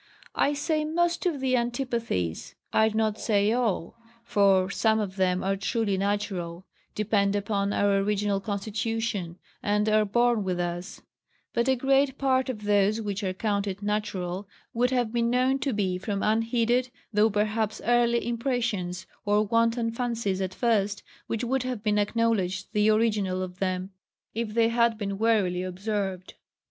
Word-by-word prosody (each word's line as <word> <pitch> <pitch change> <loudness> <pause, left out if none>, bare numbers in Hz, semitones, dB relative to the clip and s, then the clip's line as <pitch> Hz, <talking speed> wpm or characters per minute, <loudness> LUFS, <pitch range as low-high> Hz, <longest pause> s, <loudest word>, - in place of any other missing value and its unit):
I 290 - +2
say 305 +2 0
most 345 +3 0
of 315 -6 -1
the 260 -1 +2
antipathies, 235 - -2 0.2
I 220 0 +4
do 220 - -4
not 220 -1 +1
say 205 -1 +2
all; 230 -8 -1 0.3
for 195 -4 +3
some 220 +1 +2
of 195 -3 -3
them 185 -1 +1
are 195 +1 +1
truly 205 +1 0
natural, 190 -3 -2 0.3
depend 205 -1 +1
upon 200 -1 0
our 200 -1 +2
original 205 0 0
constitution, 205 -2 -3 0.2
and 210 +1 +1
are 215 0 +4
born 235 +1 +2
with 180 -2 -2
us; 175 +2 -4 0.5
but 235 +2 +1
a 260 - +4
great 270 +1 +2
part 260 -1 +1
of 215 -5 -5
those 205 +1 +2
which 205 -1 -3
are 190 - 0
counted 200 0 -2
natural, 205 -3 -2 0.3
would 245 +2 +2
have 245 -3 0
been 235 -1 +1
known 255 +2 +2
to 275 - -1
be 190 -4 -1
from 200 0 -3
unheeded, 230 +3 +1 0.2
though 210 +2 +4
perhaps 215 +1 0
early, 235 0 +2
impressions, 235 -7 -2 0.2
or 210 0 +2
wanton 230 +1 +1
fancies 230 -5 -2
at 185 -1 -3
first, 210 -4 +1 0.2
which 230 +1 -2
would 265 +2 0
have 250 -4 -4
been 210 -1 +2
acknowledged 205 -4 0
the 210 0 +3
original 210 -4 +1
of 180 0 -8
them, 185 0 -2 0.4
if 225 -1 -3
they 230 -1 +4
had 235 -1 +2
been 200 -2 -4
warily 205 -6 +2
observed. 190 0 -3
215 Hz, 155 wpm, -27 LUFS, 195-235 Hz, 0.5 s, I